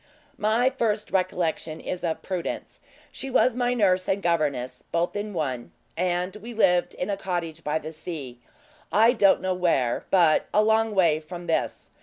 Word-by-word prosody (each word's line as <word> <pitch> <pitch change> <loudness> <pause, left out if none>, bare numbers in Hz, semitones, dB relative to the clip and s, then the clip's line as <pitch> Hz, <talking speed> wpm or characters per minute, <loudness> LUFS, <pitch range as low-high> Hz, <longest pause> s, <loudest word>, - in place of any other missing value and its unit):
"My 225 +5 +2
first 220 -5 -1
recollection 170 -4 -1
is 180 - -5
of 165 -2 -2
Prudence; 185 -3 -4 0.3
she 270 - -6
was 255 -1 +3
my 245 0 +1
nurse 185 -5 +2
and 195 - +1
governess, 150 -8 -1
both 170 +3 0
in 205 +1 -3
one; 135 -9 -3 0.2
and 180 +2 -1
we 230 +3 -9
lived 180 -5 +3
in 185 +3 -3
a 200 - -1
cottage 170 -4 -4
by 150 +1 0
the 155 - -6
sea 155 -6 -7 0.5
I 225 +3 +5
don't 200 -5 +4
know 185 0 0
where, 165 -10 +1
but 170 -5 +4
a 210 - +5
long 220 0 +2
way 165 -5 +4
from 175 +2 -9
this. 165 - -2
180 Hz, 170 wpm, -25 LUFS, 160-210 Hz, 0.5 s, I